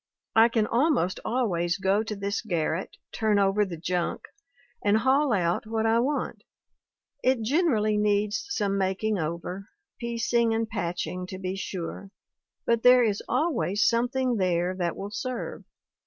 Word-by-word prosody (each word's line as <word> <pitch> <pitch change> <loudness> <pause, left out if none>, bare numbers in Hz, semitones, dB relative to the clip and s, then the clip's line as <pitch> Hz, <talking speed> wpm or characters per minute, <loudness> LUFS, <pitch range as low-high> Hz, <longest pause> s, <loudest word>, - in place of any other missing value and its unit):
I 225 +1 +7
can 225 -2 +1
almost 245 - +1
always 180 -8 0
go 195 +2 +2
to 220 -1 -4
this 200 +1 -2
garret, 170 -3 -2
turn 215 -2 +1
over 200 +1 +3
the 180 -4 -5
junk, 175 +1 -2 0.6
and 205 +1 +4
haul 265 +4 +3
out 175 -1 0
what 220 0 -1
I 225 +1 +3
want. 280 +5 -2 0.8
It 255 -2 +2
generally 225 -6 +2
needs 210 - +1
some 200 - 0
making 195 +2 0
over, 170 +5 -4 0.3
piecing 235 -1 +1
and 225 0 -1
patching, 180 -3 -3
to 185 - -7
be 185 0 -4
sure, 195 0 -5 0.6
but 235 -1 +2
there 250 0 +7
is 210 -3 0
al 330 +1 +1
ways 205 -4 +1
something 245 +1 +1
there 180 -1 +1
that 175 -3 -2
will 200 +1 -6
serve. 255 +3 -5
210 Hz, 150 wpm, -27 LUFS, 185-235 Hz, 0.8 s, I